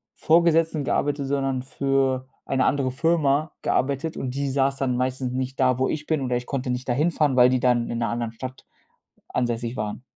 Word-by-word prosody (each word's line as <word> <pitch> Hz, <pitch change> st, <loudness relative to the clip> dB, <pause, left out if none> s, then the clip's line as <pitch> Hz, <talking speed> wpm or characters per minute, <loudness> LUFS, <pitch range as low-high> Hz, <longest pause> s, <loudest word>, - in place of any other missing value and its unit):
Vorgesetzten 165 Hz, -2 st, +3 dB
gearbeitet, 145 Hz, 0 st, 0 dB
sondern 135 Hz, -2 st, -1 dB
für 135 Hz, -1 st, 0 dB, 0.2 s
eine 130 Hz, -1 st, +1 dB
andere 135 Hz, -2 st, +1 dB
Firma 155 Hz, +1 st, +1 dB
gearbeitet 140 Hz, +4 st, 0 dB
und 130 Hz, -, -3 dB
die 140 Hz, 0 st, -1 dB
saß 135 Hz, 0 st, +1 dB
dann 130 Hz, -2 st, 0 dB
meistens 130 Hz, 0 st, -1 dB
nicht 130 Hz, +1 st, -3 dB
da, 130 Hz, -1 st, +3 dB
wo 130 Hz, -, +1 dB
ich 150 Hz, -1 st, -3 dB
bin 155 Hz, -3 st, 0 dB
oder 125 Hz, -1 st, -1 dB
ich 125 Hz, -, -6 dB
konnte 135 Hz, -1 st, -3 dB
nicht 125 Hz, +1 st, -4 dB
da 120 Hz, -, +3 dB
hinfahren, 150 Hz, -1 st, +1 dB
weil 125 Hz, 0 st, +7 dB
die 130 Hz, -1 st, +2 dB
dann 120 Hz, -2 st, +2 dB
in 120 Hz, -, -3 dB
‘ner 115 Hz, -3 st, 0 dB
anderen 115 Hz, -1 st, -2 dB
Stadt 130 Hz, +2 st, -8 dB, 0.6 s
ansässig 120 Hz, -1 st, -2 dB
waren. 105 Hz, +3 st, -4 dB
130 Hz, 195 wpm, -24 LUFS, 125-140 Hz, 0.6 s, weil